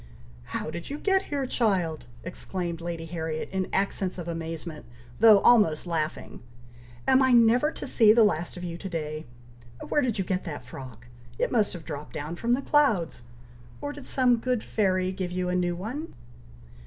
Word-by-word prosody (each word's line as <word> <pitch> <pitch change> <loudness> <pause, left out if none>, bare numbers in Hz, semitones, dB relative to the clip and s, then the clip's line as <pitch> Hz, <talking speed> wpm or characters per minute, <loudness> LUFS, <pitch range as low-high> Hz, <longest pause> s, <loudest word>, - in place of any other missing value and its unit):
"How 155 - -4
did 170 +1 -6
you 285 - -4
get 385 +3 +1
here, 280 -2 -1
child!" 190 - 0 0.2
exclaimed 170 -1 -4
Lady 170 -1 -4
Harriet, 160 -1 -4
in 190 -1 -2
accents 195 -1 -1
of 175 -2 -6
amazement, 165 -1 -5 0.3
though 220 -1 +8
almost 205 -11 +4
laughing. 160 -3 -3 0.7
"Am 265 0 +5
I 260 -1 +4
never 240 +5 +5
to - - -7
see 225 -5 +5
the 225 +1 +6
last 175 -4 0
of 180 - -7
you 170 -1 -5
to 195 - -6
day! 155 -3 -4 0.6
Where 295 - +3
did 245 -6 0
you 190 - -1
get 185 0 -1
that 150 -7 -6
frock! 125 -2 -10 0.3
It - - 0
must 220 -4 +2
have 175 -4 -9
dropped 150 -2 -6 0.2
from 235 +1 +1
the 275 - -5
clouds! 225 - +2 0.6
Or 290 0 -4
did 290 -2 -8
some 250 -2 +4
good 250 -1 -1
fairy 185 -3 +1
give 185 -2 -4
you 180 0 -1
a 180 - 0
new 175 -1 0
one?" 250 - -5
185 Hz, 180 wpm, -27 LUFS, 165-235 Hz, 0.7 s, though